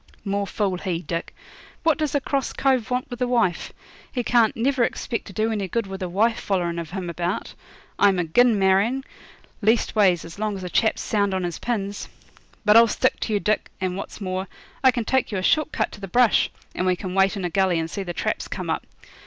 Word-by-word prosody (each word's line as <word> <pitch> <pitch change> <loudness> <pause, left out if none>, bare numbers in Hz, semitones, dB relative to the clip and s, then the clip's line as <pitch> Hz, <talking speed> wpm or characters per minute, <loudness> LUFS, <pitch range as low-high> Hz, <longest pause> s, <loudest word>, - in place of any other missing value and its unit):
'More 200 0 -1
fool 195 -4 -1
he, 180 -3 -3
Dick. 170 -1 -4 0.5
What 320 -3 +3
does 300 -2 -1
a - - +4
cross 275 0 -2
cove 260 -4 +1
want 250 0 -2
with 245 +1 -7
a 250 - +2
wife? 230 -8 +1 0.4
He 245 - -2
can't 235 -2 +3
never 255 +2 +2
expect 230 0 -2
to - - -9
do 220 +4 0
any 205 -3 -2
good 230 +4 -1
with 195 0 -7
a 185 - -2
wife 225 +6 +2
follerin' 175 -3 -1
of 165 -2 -6
him 185 0 -5
about. 175 +2 -3 0.5
I'm 200 -2 +5
agin 215 +7 +3
marrying, 200 +8 +2 0.6
leastways 210 -5 +3
as 165 +4 -10
long 215 -1 -1
as 190 - -7
a 180 - -5
chap's 220 - +2
sound 200 -3 +1
on 185 - -1
his 175 -2 -3
pins. 205 -4 -3 0.6
But 210 +1 +7
I'll 230 0 +8
stick 255 +4 +1
to 220 - -2
you, 205 - +2
Dick, 215 +1 0
and, 185 -1 -2
what's 195 - -7
more, 185 -1 -3 0.4
I 260 - +8
can 240 -3 -1
take 265 0 +1
you 200 - -1
a 185 - -2
short 310 +8 +2
cut - - -1
to 205 - -11
the 195 - -5
brush, 240 +4 +4 0.2
and 185 - -1
we 185 - +3
can 180 0 -6
wait 195 +2 +3
in 190 - -3
a 175 - -2
gully 190 -1 +2
and 160 0 -1
see 195 - -5
the 180 -2 -4
traps 170 - -2
come - - -4
up. - - -3
200 Hz, 225 wpm, -24 LUFS, 185-235 Hz, 0.6 s, I'll